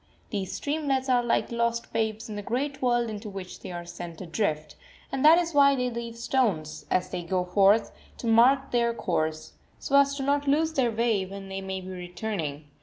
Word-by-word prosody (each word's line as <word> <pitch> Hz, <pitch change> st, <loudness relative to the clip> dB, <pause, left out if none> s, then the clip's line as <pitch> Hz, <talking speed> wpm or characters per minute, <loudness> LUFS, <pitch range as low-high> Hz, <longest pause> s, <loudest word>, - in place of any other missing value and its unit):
These 195 Hz, -4 st, -3 dB
streamlets 285 Hz, -3 st, -1 dB
are 250 Hz, -1 st, +4 dB
like 240 Hz, 0 st, 0 dB
lost 235 Hz, 0 st, -1 dB
babes 220 Hz, -1 st, -1 dB
in 215 Hz, -, -6 dB
the 205 Hz, -, -4 dB
great 275 Hz, +7 st, -3 dB
world 240 Hz, -2 st, +2 dB
into 215 Hz, 0 st, -6 dB
which 195 Hz, -2 st, -8 dB
they -, -, -8 dB
are 175 Hz, 0 st, -6 dB
sent 170 Hz, -1 st, -8 dB
adrift, 160 Hz, -4 st, -2 dB, 0.4 s
and 270 Hz, -, -2 dB
that 315 Hz, +2 st, +8 dB
is 340 Hz, -1 st, 0 dB
why 280 Hz, -1 st, +6 dB
they 250 Hz, -1 st, -1 dB
leave 235 Hz, 0 st, -6 dB
stones, 220 Hz, -, -1 dB
as 185 Hz, 0 st, +1 dB
they 180 Hz, -, -3 dB
go 180 Hz, +1 st, -1 dB
forth, 200 Hz, +4 st, +4 dB, 0.3 s
to -, -, -7 dB
mark 255 Hz, +4 st, +4 dB
their 235 Hz, -1 st, +1 dB
course, 155 Hz, -5 st, -2 dB, 0.2 s
so 280 Hz, -, -1 dB
as 280 Hz, 0 st, +4 dB
not 285 Hz, +1 st, +1 dB
to -, -, 0 dB
lose 315 Hz, +3 st, +2 dB
their 260 Hz, -5 st, +2 dB
way 225 Hz, -3 st, +1 dB
when 195 Hz, 0 st, -8 dB
they 195 Hz, 0 st, -4 dB
may 190 Hz, 0 st, -4 dB
be 185 Hz, -, -9 dB
returning. 175 Hz, -4 st, -4 dB
225 Hz, 200 wpm, -27 LUFS, 185-260 Hz, 0.4 s, that